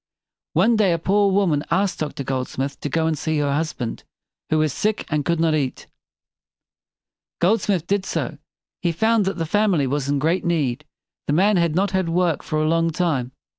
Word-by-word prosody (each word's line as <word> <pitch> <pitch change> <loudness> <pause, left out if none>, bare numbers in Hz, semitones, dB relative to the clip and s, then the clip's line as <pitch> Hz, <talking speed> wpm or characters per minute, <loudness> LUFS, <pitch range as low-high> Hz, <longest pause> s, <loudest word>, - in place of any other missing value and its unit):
One 230 0 +3
day 195 -5 +3
a - - +1
poor 200 +4 +2
woman 185 -7 +2
asked 190 +2 +1
Doctor 150 -2 -3
Goldsmith 135 +1 -3
to 145 - -3
go 160 +3 0
and 160 -1 +1
see 160 +1 -2
her 145 -1 +1
husband, 145 -6 -3 0.5
who 155 - +2
was 155 -2 +1
sick 215 0 -1
and 150 -1 +1
could 170 +1 0
not 165 -1 +2
eat. 140 -4 -2 1.5
Goldsmith 190 -2 +1
did 200 +1 -1
so. - - -3 0.4
He 170 -2 0
found 220 +4 +2
that 195 - -2
the 165 - -1
family 190 -4 +2
was 140 +1 -2
in 145 - +1
great 160 +6 +1
need. 150 -5 -1 0.4
The 145 - +1
man 195 +5 +4
had 170 -3 +1
not 195 +2 +1
had 190 -3 0
work 170 -2 +1
for 155 - -2
a 155 - +1
long 165 +1 +2
time. 155 -7 -1
165 Hz, 190 wpm, -22 LUFS, 150-190 Hz, 1.5 s, man